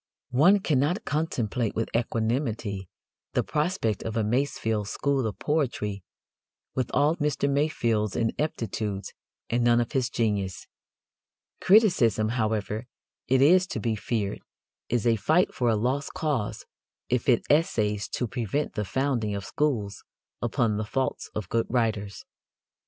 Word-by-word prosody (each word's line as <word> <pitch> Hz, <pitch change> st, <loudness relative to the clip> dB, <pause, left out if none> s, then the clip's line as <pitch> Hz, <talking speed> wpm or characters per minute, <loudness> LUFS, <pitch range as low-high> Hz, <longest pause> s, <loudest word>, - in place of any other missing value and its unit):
One 175 Hz, +11 st, +5 dB
cannot 155 Hz, -, +1 dB
contemplate 125 Hz, -8 st, -1 dB
with 115 Hz, -, -2 dB
equanimity 115 Hz, -, -1 dB, 0.4 s
the -, -, +2 dB
prospect 150 Hz, -, -1 dB
of 110 Hz, 0 st, -4 dB
a 110 Hz, -, +2 dB
Masefield 110 Hz, -3 st, 0 dB
school 135 Hz, 0 st, 0 dB
of 105 Hz, -, -5 dB
poetry 120 Hz, -, -1 dB, 0.7 s
with 130 Hz, -2 st, -1 dB
all 150 Hz, +3 st, +3 dB
Mr. 150 Hz, -2 st, 0 dB
Masefield's 120 Hz, -8 st, +1 dB
ineptitudes 110 Hz, -5 st, -2 dB, 0.4 s
and 120 Hz, +1 st, +2 dB
none 120 Hz, 0 st, +4 dB
of 120 Hz, -, -1 dB
his 130 Hz, -2 st, 0 dB
genius. 100 Hz, -6 st, -1 dB, 0.9 s
Criticism, 170 Hz, -, +4 dB
however, 110 Hz, -1 st, -1 dB, 0.4 s
it 130 Hz, +1 st, +4 dB
is 180 Hz, +5 st, +5 dB
to 120 Hz, -, -4 dB
be 110 Hz, 0 st, 0 dB
feared, 105 Hz, -1 st, -2 dB, 0.5 s
is 120 Hz, -3 st, 0 dB
a 115 Hz, -1 st, +4 dB
fight 155 Hz, -, +2 dB
for 120 Hz, -2 st, +1 dB
a 110 Hz, -, +3 dB
lost 130 Hz, +6 st, -1 dB
cause 140 Hz, -10 st, -2 dB, 0.4 s
if 125 Hz, +2 st, 0 dB
it 120 Hz, -, +4 dB
essays 110 Hz, -, +2 dB
to 125 Hz, -, -2 dB
prevent 125 Hz, +5 st, -2 dB
the 105 Hz, -2 st, -2 dB
founding 120 Hz, -1 st, 0 dB
of 100 Hz, -1 st, -5 dB
schools 120 Hz, -10 st, -1 dB, 0.4 s
upon 110 Hz, -3 st, +1 dB
the 110 Hz, -, -1 dB
faults 130 Hz, +5 st, -2 dB
of 110 Hz, -4 st, -3 dB
good 115 Hz, +3 st, 0 dB
writers. 110 Hz, -4 st, -1 dB
120 Hz, 135 wpm, -27 LUFS, 105-140 Hz, 0.9 s, One